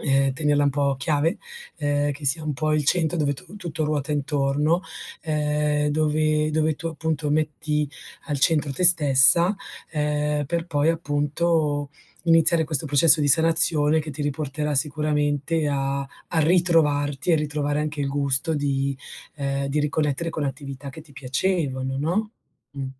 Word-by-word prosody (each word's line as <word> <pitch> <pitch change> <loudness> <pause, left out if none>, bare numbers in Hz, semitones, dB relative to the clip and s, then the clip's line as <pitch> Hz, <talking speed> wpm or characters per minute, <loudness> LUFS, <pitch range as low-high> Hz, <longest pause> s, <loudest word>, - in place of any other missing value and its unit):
ehm, 135 -1 +2
tenerla 145 0 +1
un 140 - +2
po' 140 -1 0
chiave, 150 +3 0 0.4
ehm, 145 -1 0
che 145 +1 -10
sia 140 +4 +1
un 155 - -2
po' 155 +2 -1
il 150 -2 0
centro 170 +1 +1
dove 145 -2 +1
tu 185 +7 -12
tutto 165 -5 -4
ruota 150 -1 -2
intorno, 145 +3 0 0.4
ehm, 150 -1 0
dove 155 0 +1
dove 155 0 +1
tu 165 - -5
appunto 160 -2 -3
metti 150 0 -1 0.4
al 145 -2 -2
centro 150 -2 +2
te 160 - -4
stessa, 170 +2 +6 0.4
ehm, 150 -1 -1
per 170 +3 -2
poi 145 -2 0
appunto 150 -1 -1 0.3
iniziare 165 0 +4
questo 155 -1 0
processo 150 +2 +5
di 145 - +1
sanazione 160 0 +4
che 155 0 -7
ti 145 +1 -5
riporterà 145 +1 -3
sicuramente 150 +1 0
a 140 -1 -1
a 140 +4 -6
ritrovarti 155 -4 +2
e 160 - +5
ritrovare 145 -1 -2
anche 150 -1 -4
il 140 - -1
gusto 140 +2 0
di, 140 -1 -1 0.4
ehm, 140 -1 -2
di 140 +2 -2
riconnettere 150 +2 -1
con 160 - -4
attività 140 0 -6
che 145 - -11
ti 155 -2 -16
piacevano, 135 -1 -2
no, 185 +9 -1 0.4
mh. 135 -1 -5
150 Hz, 155 wpm, -23 LUFS, 140-160 Hz, 0.4 s, stessa